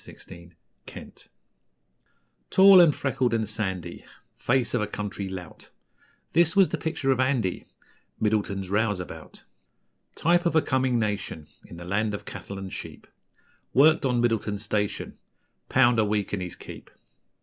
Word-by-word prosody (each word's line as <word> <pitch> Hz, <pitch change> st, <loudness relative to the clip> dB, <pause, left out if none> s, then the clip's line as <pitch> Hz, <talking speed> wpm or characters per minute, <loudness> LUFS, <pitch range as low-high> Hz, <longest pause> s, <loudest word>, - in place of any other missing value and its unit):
Middleton's 85 Hz, 0 st, -13 dB, 0.3 s
Rouseabout -, -, -12 dB, 1.2 s
Tall 190 Hz, -1 st, +8 dB
and 160 Hz, -4 st, +5 dB
freckled 130 Hz, -3 st, 0 dB
and 110 Hz, -2 st, -1 dB
sandy, 95 Hz, -5 st, -4 dB, 0.3 s
Face 125 Hz, -1 st, 0 dB
of 120 Hz, -, +1 dB
a 105 Hz, -, -1 dB
country 105 Hz, -1 st, -5 dB
lout; 90 Hz, -3 st, -9 dB, 0.6 s
This 170 Hz, +3 st, +3 dB
was 195 Hz, -2 st, +5 dB
the -, -, -3 dB
picture 150 Hz, -4 st, -1 dB
of 130 Hz, -, 0 dB
Andy, 130 Hz, -8 st, 0 dB, 0.5 s
Middleton's 100 Hz, -3 st, -1 dB
Rouseabout. 100 Hz, -3 st, -3 dB, 0.7 s
Type 175 Hz, +2 st, +2 dB
of 170 Hz, -, -1 dB
a 160 Hz, -, +5 dB
coming 130 Hz, -2 st, +1 dB
nation, 100 Hz, -8 st, -3 dB, 0.2 s
In 85 Hz, -, -12 dB
the 85 Hz, -, -9 dB
land 105 Hz, +3 st, -1 dB
of -, -, -9 dB
cattle 100 Hz, -, -8 dB
and 95 Hz, -1 st, -7 dB
sheep, -, -, -8 dB, 0.7 s
Worked 155 Hz, +4 st, +5 dB
on 125 Hz, -3 st, +1 dB
Middleton's 110 Hz, -3 st, -1 dB
station, 105 Hz, -2 st, -3 dB, 0.5 s
'Pound 120 Hz, -3 st, +4 dB
a -, -, +4 dB
week 105 Hz, -1 st, -1 dB
and 100 Hz, -, -2 dB
his 90 Hz, -1 st, -6 dB
keep.' -, -, -11 dB
110 Hz, 145 wpm, -26 LUFS, 100-130 Hz, 1.2 s, Tall